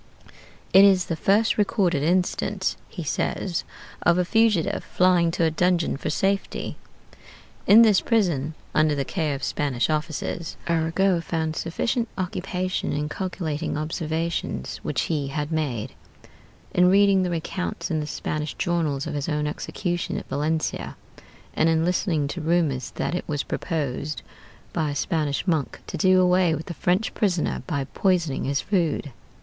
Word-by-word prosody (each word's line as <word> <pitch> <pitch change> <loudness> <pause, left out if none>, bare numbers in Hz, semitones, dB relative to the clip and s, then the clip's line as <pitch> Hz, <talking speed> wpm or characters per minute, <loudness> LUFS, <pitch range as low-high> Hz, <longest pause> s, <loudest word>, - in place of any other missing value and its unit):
It 195 - +9
is 190 -3 +5
the 165 - -2
first 210 +7 +2
recorded 190 -7 +2
instance, 185 +4 0
he 175 - -6
says, 170 +3 -1 0.4
of 175 0 +4
a 180 - +2
fugitive 220 -4 +2
flying 180 -2 +3
to 165 0 0
a 160 - +3
dungeon 175 +1 +1
for 135 - -4
safety. 195 +5 -1 0.9
In 220 +3 +9
this 210 -4 +5
prison, 165 - +1 0.2
under 155 -1 +3
the 140 -1 -1
care 155 -4 -1
of 135 - -8
Spanish 140 -1 0
officers, 155 +2 -3
Arago 170 +2 +2
found 160 0 -2
sufficient 230 +10 -1
occupation 185 0 -2
in 150 +1 -2
calculating 165 -5 -3
observations 160 +2 -3
which - - -1
he 150 -4 -1
had 150 +2 -3
made; 135 -7 -2 0.8
in 180 0 +5
reading 195 0 +5
the 180 -1 0
accounts 180 +4 -4
in 160 - +1
the 150 - -3
Spanish 150 0 -3
journals 160 -5 0
of 160 - -4
his 145 +2 -2
own 150 -1 0
execution 175 +3 -3
at - - -7
Valencia; 155 +3 -2 0.6
and 160 - +3
in 160 0 +2
listening 170 -4 +1
to 175 - -4
rumors 155 -5 +1
that - - -2
it 180 - -2
was 145 -2 -1
proposed 150 -2 -3 0.5
(by 160 -3 0
a 145 - -3
Spanish 150 -1 -1
monk) 160 -7 0
to - - -6
do 185 -1 +4
away 180 -2 +4
with 155 - -6
the 175 - -5
French 185 +5 0
prisoner 185 -6 0
by 145 -6 -1
poisoning 175 -8 +1
his 140 0 0
food. 165 -7 0
165 Hz, 155 wpm, -24 LUFS, 150-185 Hz, 0.9 s, It